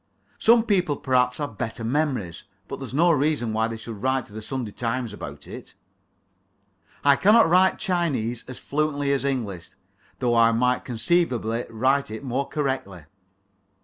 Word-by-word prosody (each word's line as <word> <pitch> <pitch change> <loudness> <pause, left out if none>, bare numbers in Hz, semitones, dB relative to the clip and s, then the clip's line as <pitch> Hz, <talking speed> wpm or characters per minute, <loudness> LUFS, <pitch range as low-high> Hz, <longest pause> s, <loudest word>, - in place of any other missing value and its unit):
Some 230 0 +5
people 180 -10 +1
perhaps 125 -1 +1
have 145 -9 -5
better 115 -1 -4
memories. 125 - -2 0.2
But - - -6
that's - - -7
no 170 +6 +4
reason 145 -6 +1
why 110 +1 +1
they 115 0 -5
should 110 -2 -8
write 130 0 0
to 105 - -17
the 110 - -6
"Sunday 120 -1 -4
Times" 115 0 -3
about 70 -7 -8
it. - - -10 1.3
I 140 -1 +6
cannot 215 +7 +5
write 185 +3 +4
Chinese 145 - -1
as 130 - -8
fluently 145 -1 -1
as 135 - -1
English, 100 -11 -3 0.5
though 120 -2 0
I 115 0 +5
might 125 +2 +1
conceivably 120 -2 0
write 130 +5 +1
it 110 +4 -7
more 135 +1 -2
correctly. 130 - -3
130 Hz, 155 wpm, -24 LUFS, 115-145 Hz, 1.3 s, I